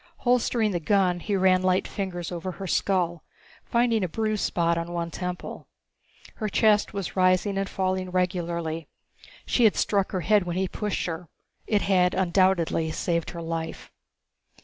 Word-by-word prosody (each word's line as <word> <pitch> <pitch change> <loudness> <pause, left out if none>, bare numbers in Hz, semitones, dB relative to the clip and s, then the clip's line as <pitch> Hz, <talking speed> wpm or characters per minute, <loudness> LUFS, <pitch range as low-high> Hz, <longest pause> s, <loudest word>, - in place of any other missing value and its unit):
Holstering 240 -3 +2
the 175 - -1
gun, 180 0 +2
he 205 +3 -2
ran 185 -1 +4
light 185 0 +1
fingers 180 -4 -4
over 175 +1 -4
her 195 - -7
skull, 175 -2 0 0.4
finding 235 -3 +1
a - - +1
bruised 215 +2 -1
spot 170 -1 +1
on 170 +1 -3
one 170 -1 -3
temple. 180 0 -6 0.7
Her 215 - -2
chest 210 +1 +3
was 195 -3 -5
rising 185 +2 +3
and 195 0 -1
falling 185 -1 -1
regularly. 170 -3 -2 0.6
She 240 - +3
had 215 - +5
struck 200 -2 +1
her 185 - -1
head 210 +3 +4
when 175 0 -3
he 190 0 +1
pushed 210 +1 -3
her. 165 -1 -5 0.4
It 210 -2 +2
had 180 -2 +3
undoubtedly 180 -3 +2
saved 170 +1 -1
her 170 -1 -7
life. 165 0 -5
185 Hz, 160 wpm, -26 LUFS, 170-200 Hz, 0.7 s, had